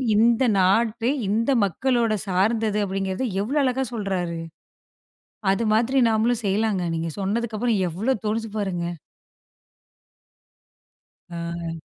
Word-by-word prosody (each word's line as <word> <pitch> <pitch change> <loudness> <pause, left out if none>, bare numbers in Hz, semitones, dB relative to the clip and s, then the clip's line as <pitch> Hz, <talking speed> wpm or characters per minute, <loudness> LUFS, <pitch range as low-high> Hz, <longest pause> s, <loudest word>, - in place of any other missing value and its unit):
இந்த 235 +3 +4 0.2
நாட்டு, 225 +5 +2 0.2
இந்த 230 +6 +1
மக்களோட 235 +2 +1
சார்ந்தது 210 +3 +1
அப்படிங்கிறது 195 +3 -2 0.2
எவ்வளோ 285 +7 0
அழகா 265 0 +1
சொல்றாரு. 185 -6 -2 1.1
அது 215 - -1
மாதிரி 240 +5 +2
நாமளும் 225 +1 +1
செய்யலாங்க. 200 -1 +1
நீங்க 165 0 -2
சொன்னதுக்கு 215 +3 -1
அப்புறம் 235 -4 +1
எவ்வளோ 210 +11 0
தோணுது 220 +1 -1
பாருங்க. 185 -4 -2 2.5
ஆ. 170 -1 -5
215 Hz, 100 wpm, -24 LUFS, 190-235 Hz, 2.5 s, இந்த